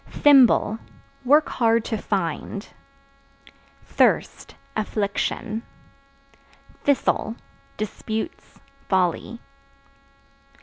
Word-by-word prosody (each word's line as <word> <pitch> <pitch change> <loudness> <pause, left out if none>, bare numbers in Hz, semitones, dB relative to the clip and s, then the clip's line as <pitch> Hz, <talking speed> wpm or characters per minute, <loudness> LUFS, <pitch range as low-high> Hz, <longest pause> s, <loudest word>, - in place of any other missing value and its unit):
Thimble 255 -6 +5 0.5
Work 295 +4 +5
hard 230 -1 +2
to 220 - -2
find. 200 +1 -3 1.2
Thirst - - +1 0.2
Affliction. 215 +1 -2 1.2
Thistle 260 -5 +1 0.4
Disputes, 220 - -5 0.3
folly. 185 -3 0
220 Hz, 55 wpm, -23 LUFS, 205-240 Hz, 1.2 s, Thimble